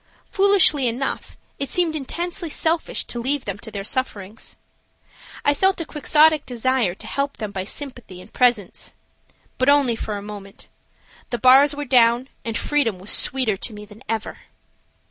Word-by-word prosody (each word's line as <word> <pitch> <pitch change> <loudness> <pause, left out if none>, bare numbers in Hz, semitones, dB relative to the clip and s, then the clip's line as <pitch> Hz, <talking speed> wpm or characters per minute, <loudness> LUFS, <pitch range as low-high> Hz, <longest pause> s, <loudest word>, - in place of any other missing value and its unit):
Foolishly 385 -9 +3
enough, 250 +4 -3 0.2
it 275 - -3
seemed 345 -3 +1
intensely 340 +4 -4
selfish 320 +2 -1
to 240 - -5
leave 275 +3 0
them 200 -1 -5
to 220 - -10
their 200 -2 -6
sufferings. 215 -3 -5 0.9
I 290 - +4
felt 380 +5 +2
a 335 - -4
Quixotic 305 0 +3
desire 245 -5 0
to - - -12
help 280 0 -3
them 215 -3 -5
by 190 -2 -4
sympathy 250 -7 -8
and - - -15
presence. 240 -7 0 0.6
But 255 +2 +3
only 280 -5 +4
for 215 -2 -4
a 200 - -8
moment. 200 -1 -10 0.6
The 240 - -2
bars 270 +4 +5
were 290 0 -5
down 245 0 +3
and 230 -1 -3
freedom 280 -9 0
was 190 +3 -2
sweeter 255 -7 +4
to 225 - -2
me 210 0 -10
than 210 +2 -16
ever. 225 -1 -4
255 Hz, 165 wpm, -21 LUFS, 215-290 Hz, 0.9 s, bars